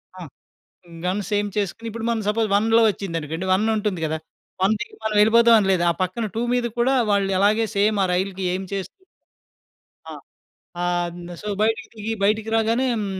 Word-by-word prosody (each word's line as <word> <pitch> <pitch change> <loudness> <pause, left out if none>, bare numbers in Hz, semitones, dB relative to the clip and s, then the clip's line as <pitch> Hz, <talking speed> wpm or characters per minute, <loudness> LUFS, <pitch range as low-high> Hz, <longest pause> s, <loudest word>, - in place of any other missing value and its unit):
ఆ! - - -11 0.9
Guns 190 +2 -2
aim 205 0 -1
చేసుకొని 205 +3 -3
ఇప్పుడు 225 +1 -6
మనం 230 -1 0
సపోజ్ 220 +1 +1
1 225 +3 +4
వచ్చిందనుకోండి. 165 -4 -4
1 190 +4 +3
ఉంటుంది 210 -4 -2
కదా! 160 0 -2 0.4
1 195 +3 +4
దికి 235 - -7
మనం 220 -1 -1
వెళ్ళిపోతాం 230 +2 +6
అని 195 -2 0
లేదు. 180 -2 +2
ఆ - - +4
పక్కన 185 +5 -3
2 225 - -1
మీద 245 -1 +1
కూడా 260 +3 +3 0.2
వాళ్ళు 200 -1 +1
అలాగే 215 +3 +3
సేమ్ 210 +1 +2
ఆ - - +3
రైలు‌కి 190 +1 -2
ఎయిమ్ 190 0 -4
చేస్తూ 195 - -5 1.1
ఆ! - - -9 0.7
ఆహ్, 175 0 -1 0.2
సో 210 - -8
బయటికి 225 +1 0
దిగి 220 +1 -4
బయటికి 215 +2 +1
రాగానే 225 +3 +1
హ్మ్. 215 -3 -2
210 Hz, 175 wpm, -22 LUFS, 190-225 Hz, 1.1 s, వెళ్ళిపోతాం